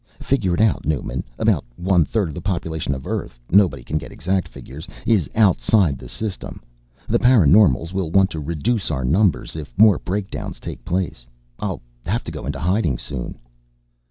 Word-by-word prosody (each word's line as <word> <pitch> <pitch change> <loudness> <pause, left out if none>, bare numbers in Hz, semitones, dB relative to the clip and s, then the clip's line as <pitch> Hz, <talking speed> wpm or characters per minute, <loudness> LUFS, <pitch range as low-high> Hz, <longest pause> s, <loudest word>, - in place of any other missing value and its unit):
Figure 105 -10 +1
it 90 - 0
out, 110 -3 +2
Newman, 70 -4 -2
about - - +2
one 90 -1 +3
third 95 -6 -1
the 90 - -6
population 80 -6 -2
of 65 - -8
Earth - - -4
nobody 90 -9 +4
can 75 +4 -2
get - - -10
exact 95 +3 -1
figures 75 +7 -10 0.2
is 105 -9 +2
outside 100 - +3
the - - -10
System. 95 - -5 0.5
The - - +2
paraNormals 95 - +5
will 95 -4 -1
want 95 +3 +3
to 80 - -4
reduce 85 +9 -1
our 65 -5 -2
numbers 85 0 +1
if 75 -6 -8
more 105 -1 +6
breakdowns 100 +2 -4
take - - -8
place. 85 -9 -3 0.3
I'll - - -4 0.2
have 110 +6 0
to - - -6
go - - -7
into - - -3
hiding 90 - +1
soon." 65 -1 -6
90 Hz, 170 wpm, -21 LUFS, 75-100 Hz, 0.5 s, more